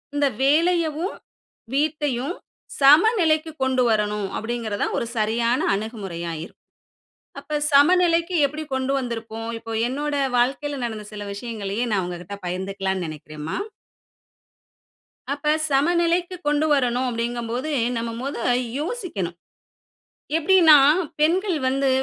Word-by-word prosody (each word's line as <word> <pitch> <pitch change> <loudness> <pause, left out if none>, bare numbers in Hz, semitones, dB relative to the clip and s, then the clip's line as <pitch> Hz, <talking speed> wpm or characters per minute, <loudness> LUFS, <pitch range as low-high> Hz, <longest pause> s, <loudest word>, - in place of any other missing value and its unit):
இந்த 290 -1 +3 0.2
வேலையவும், 330 +3 +2 0.6
வீட்டையும் 295 0 -1 0.5
சமநிலைக்கு 320 - +5
கொண்டு 260 -1 +2
வரணும் 210 -2 0
அப்படிங்கிறது 225 -2 -3
தான் - - -1
ஒரு - - -2
சரியான 230 +3 +1 0.2
அணுகுமுறையா 195 -6 -5
இருக்கும். - - -14 0.8
அப்ப 300 -1 -3
சமநிலைக்கு 340 +3 +4
எப்படி 305 +3 -6
கொண்டு 265 +1 -1
வந்திருப்போம்? 225 -2 -5
இப்போ 225 0 -8 0.2
என்னோட 290 +3 -2 0.2
வாழ்க்கைல 275 +3 0
நடந்த 220 -2 -4
சில 205 -1 -6
விஷயங்களையே 215 0 -4
நான் 190 -3 +1
உங்க 175 -1 -5
கிட்ட 200 +3 -8
பகிர்ந்துக்கலாம்ன்னு 190 0 -2
நெனைக்கிறேன்ம்மா. 155 - -6 1.7
அப்ப 300 +1 +1 0.2
சமநிலைக்கு 345 +5 +2
கொண்டு 295 +1 +2
வரணு 250 -3 +1
அப்டிங்கும் 235 0 -3
போது, 260 +6 -2 0.3
நம்ம 230 0 -2
மொத 275 +2 -4 0.4
யோசிக்கணும். 305 - -4 1.0
எப்டின்னா 330 -2 +7 0.4
பெண்கள் 350 +2 +2
வந்து 270 +1 +1
260 Hz, 110 wpm, -23 LUFS, 215-310 Hz, 1.7 s, எப்டின்னா